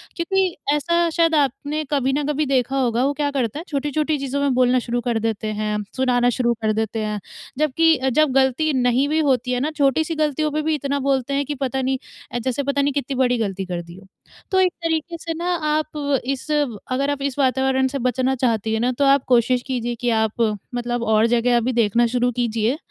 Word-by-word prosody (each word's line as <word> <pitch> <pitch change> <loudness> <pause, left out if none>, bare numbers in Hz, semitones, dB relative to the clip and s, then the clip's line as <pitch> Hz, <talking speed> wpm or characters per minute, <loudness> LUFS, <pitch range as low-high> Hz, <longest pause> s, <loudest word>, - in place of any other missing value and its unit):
क्योंकि 370 +1 0 0.2
ऐसा 340 +3 +1
शायद 330 0 +2
आपने 290 +2 0
कभी 270 -2 +1
ना 290 +1 0
कभी 300 +1 0
देखा 265 -1 0
होगा 245 -2 +1
वो 285 - +1
क्या 290 -1 +1
करता 265 -1 -2
है - - -6
छोटी-छोटी 295 +1 -1
चीज़ों 275 +1 -2
में 280 -2 +2
बोलना 250 0 +3
शुरू 240 0 -2
कर 235 -2 -1
देते 220 -1 -2
हैं, 210 0 -2 0.2
सुनाना 245 -2 +2
शुरू 240 -1 +1
कर 215 0 +1
देते 220 +1 -2
हैं 210 0 -3 0.4
जबकि 305 +2 +3
जब 310 +1 +3
गलती 270 +4 +2
नहीं 250 +1 +2
भी 310 +1 +1
होती 255 -4 +1
है 250 - 0
ना 295 +5 -1
छोटी 280 +1 +3
सी 325 +1 -4
गलतियों 305 0 0
पे 305 +1 -1
भी 315 0 0
इतना 280 0 -2
बोलते 270 -1 0
हैं 280 +1 0
कि 295 - -4
पता 265 -1 -2
नहीं 265 +1 0 0.4
अ, 240 - -1
जैसे 260 +3 -2
पता 280 +1 0
नहीं 280 0 +1
कितनी 280 -1 -2
बड़ी 250 -1 +2
गलती 195 -3 -2
कर 175 -2 -4
दी 170 0 -12
हो। 190 0 -15 0.4
तो 380 - +3
एक 370 -1 +3
तरीके 330 +1 -1
से 330 0 -4
ना 345 +2 -2 0.2
आप 295 -3 -1
इस 270 +2 -3 0.4
अगर 275 +2 0
आप 285 -1 -2
इस 280 0 -3
वातावरण 265 0 +2
से 275 +1 -4
बचना 255 +2 0
चाहती 225 -4 0
हैं 220 - 0
ना, 245 +2 +1
तो 280 +3 0
आप 275 -1 +4
कोशिश 245 0 +3
कीजिए 240 -2 -2
कि 245 - +1
आप 220 0 0 0.3
मतलब 240 0 -2
और 220 0 +3
जगह 240 +1 +2
अभी 245 +2 0
देखना 235 0 +3
शुरू 245 +1 +1
कीजिए 235 +1 0
265 Hz, 220 wpm, -21 LUFS, 240-290 Hz, 0.4 s, आप